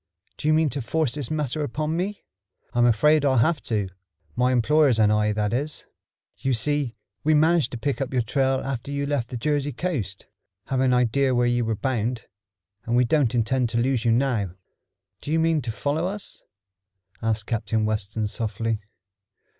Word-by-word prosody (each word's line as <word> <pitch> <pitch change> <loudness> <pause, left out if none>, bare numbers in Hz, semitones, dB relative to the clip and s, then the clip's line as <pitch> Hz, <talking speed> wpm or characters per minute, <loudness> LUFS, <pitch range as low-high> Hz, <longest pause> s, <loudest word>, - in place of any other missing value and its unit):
Do - - -3
you 155 - +5
mean 155 -2 +2
to 140 - -3
force 140 +2 0
this 145 -5 -3
matter 150 -1 -2
upon 150 +3 -2
me?" 195 +4 -3 0.5
"I'm 120 0 +4
afraid 150 +7 +4
I'll 135 -2 +3
have 145 +5 +2
to 105 -4 0 0.5
my 125 +1 +2
employers 130 +1 +4
and 105 -1 +4
I, 105 0 +2
that 105 0 -1
is. 145 +5 -2 0.5
You 135 -2 0
see, 140 +1 0 0.3
we 155 +1 +4
managed 160 +1 +3
to - - -3
pick 140 +4 -2
up 135 - -2
your 125 -3 +1
trail 135 +3 +1
after 135 -1 -4
you 140 0 -2
left 140 -5 -1
the 125 - -4
Jersey 145 +2 0
coast, 120 - -3 0.4
having 130 0 +1
an 125 - +3
idea 125 +2 +2
where 120 0 +3
you 120 0 +2
were 110 0 0
bound, 120 -1 -2 0.6
and 115 - 0
we 125 0 +4
don't 130 -2 +2
intend 120 +1 +1
to 115 - -2
lose 125 0 +1
you 115 - +3
now." 115 -7 +1 0.7
"Do 150 - -5
you 160 - +3
mean 160 -1 +2
to 115 -2 -3
follow 145 +8 -1
us?" 200 +1 -7 0.8
asked 110 -2 -1
Captain 110 -1 -1
Weston 105 0 -2
softly. 110 +1 -2
130 Hz, 185 wpm, -24 LUFS, 115-145 Hz, 0.8 s, you